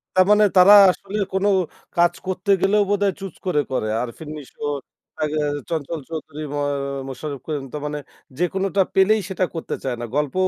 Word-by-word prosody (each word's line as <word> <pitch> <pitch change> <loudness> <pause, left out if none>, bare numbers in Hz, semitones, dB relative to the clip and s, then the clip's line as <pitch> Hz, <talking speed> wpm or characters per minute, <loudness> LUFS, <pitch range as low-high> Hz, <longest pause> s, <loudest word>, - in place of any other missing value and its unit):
তার 185 - +6
মানে 210 0 +6
তারা 185 +3 +9 0.2
আসলে 200 +3 -6 0.2
কোন 190 +1 +1 0.5
কাজ 175 0 +4
করতে 185 +1 -4
গেলেও 205 +1 +3
বোধহয় 200 -1 +2
চুজ 195 -3 -7
করে, 175 -5 +1
করে। 110 -4 -1
আরেফিন 125 +6 -7
নিশো, 140 - -13 0.6
আ - - 0 0.5
চঞ্চল 165 0 -3
চৌধুরী, 155 -1 -6
মুয়া 145 0 -1 0.4
মোশারফ 140 +2 -5
করিম 150 -3 -3
তা - - -3
মানে 150 0 -3 0.4
যেকোনটা 190 +3 +1
পেলেই 210 +3 +4
সেটা 185 -1 0
করতে 165 - -3
চায় 130 -2 -1
না। 120 - -4
গল্পও 150 +6 +1
175 Hz, 165 wpm, -22 LUFS, 150-190 Hz, 0.6 s, তারা